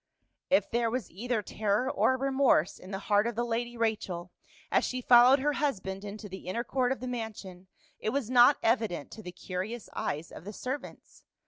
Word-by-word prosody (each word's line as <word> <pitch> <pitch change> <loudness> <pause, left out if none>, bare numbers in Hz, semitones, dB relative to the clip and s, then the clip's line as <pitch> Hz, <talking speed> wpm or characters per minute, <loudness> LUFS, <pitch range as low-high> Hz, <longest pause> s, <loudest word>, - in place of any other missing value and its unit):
If 210 -8 +3
there 235 0 +1
was 250 +1 -3
either 225 +3 -2
terror 210 +4 0
or 260 -1 +2
remorse 265 - +2
in 185 - -12
the 195 - -3
heart 205 +1 +3
of 235 - -3
the 240 - 0
lady 240 +1 -3
Rachel 195 -6 -2 0.4
as - - +3
she 255 - -2
followed 245 +2 +7
her 295 +2 0
husband 195 -10 -2
into 205 +1 -7
the 190 -2 -9
inner 230 +6 -2
court 255 -1 0
of 265 - -2
the 255 - -4
mansion, 210 -6 -6 0.3
it - - -1
was 270 -1 -1
not 250 +3 +6
evident 225 - 0
to 220 - -9
the 180 - -8
curious 185 +5 -5
eyes 150 +3 -3
of - - -10
the 205 +3 -7
servants. 260 +7 -7
225 Hz, 195 wpm, -29 LUFS, 195-250 Hz, 0.4 s, followed